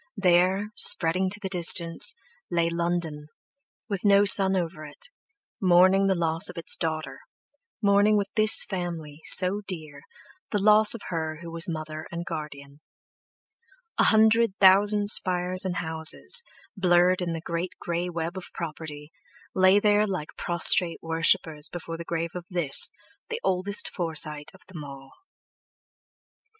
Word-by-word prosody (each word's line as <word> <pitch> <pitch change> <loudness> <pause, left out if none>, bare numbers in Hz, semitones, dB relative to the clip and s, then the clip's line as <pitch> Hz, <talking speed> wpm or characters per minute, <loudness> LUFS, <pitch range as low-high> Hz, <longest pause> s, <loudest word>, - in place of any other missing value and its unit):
There—spreading 185 -1 +1
to 205 +2 -2
the 195 - -6
distance, 170 - +4 0.3
lay 170 -1 -1
London, 170 -3 -4 0.6
with 200 -4 -5
no 200 -1 +4
sun 195 -1 +5
over 170 -3 -4
it, 150 - -10 0.5
mourning 185 +1 +3
the 190 - +1
loss 165 0 0
of 180 - -12
its 170 - -1
daughter, 160 -1 -5 0.6
mourning 205 +1 +3
with 200 0 -3
this 215 0 +5
family, 165 -5 -7
so 190 +2 +3
dear, 155 -6 -8 0.5
the 210 - -2
loss 210 +2 +4
of 230 - -10
her 160 -2 -5
who 170 - -9
was 165 +1 -2
mother 155 -1 -7
and 170 0 -6
guardian. 145 -3 -9 1.2
A - - +4
hundred 220 -1 +2
thousand 205 +2 +4
spires 185 0 +1
and 180 -1 -3
houses, 160 - +2 0.3
blurred 180 -1 +2
in 170 -2 -3
the 165 - -5
great 170 +2 -5
grey 175 +1 -4
web 170 +1 -6
of 185 - -9
property, 155 -2 -8 0.4
lay 185 +1 +3
there 210 0 +1
like 185 -6 -5
prostrate 170 0 +4
worshippers 160 -2 0
before 165 -1 -8
the 170 - -8
grave 170 0 -4
of 175 -1 -9
this, 170 -7 +2 0.4
the 460 0 -5
oldest 190 +2 -1
Forsyte 155 -4 -4
of 190 - -20
them 170 -5 -10
all. 135 -1 -12
175 Hz, 140 wpm, -24 LUFS, 165-195 Hz, 1.2 s, sun